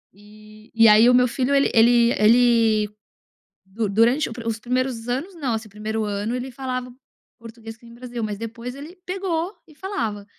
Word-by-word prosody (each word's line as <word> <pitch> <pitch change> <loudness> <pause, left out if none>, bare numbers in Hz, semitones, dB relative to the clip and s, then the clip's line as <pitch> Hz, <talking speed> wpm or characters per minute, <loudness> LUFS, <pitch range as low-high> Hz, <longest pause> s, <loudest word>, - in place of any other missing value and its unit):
Eh, 215 +1 -18
e 225 -1 +5
aí 220 +3 +6
o - - +4
meu 250 0 +4
filho 260 +3 -1
ele 275 - +3
ele 235 +1 +5
ele, 225 -2 +3 0.8
du 210 +3 -3
durante 230 +8 +2
o - - -7
os 225 -1 -2
primeiros 245 -1 -2
anos 295 +10 -3
não, 275 -8 -2
assim, 220 -1 -5
primeiro 215 +2 -4
ano 205 +3 -3
ele 255 +1 -5
falava 255 -1 -5 0.5
português 225 -1 -11
que 235 - -24
nem 230 - -14
o 235 - -15
Brasil, 245 -1 -7
mas 210 -1 -4
depois 230 +3 -7
ele 295 +5 -10
pegou 365 -1 -3
e 305 - -18
falava. 225 - -4
235 Hz, 185 wpm, -22 LUFS, 220-255 Hz, 0.8 s, aí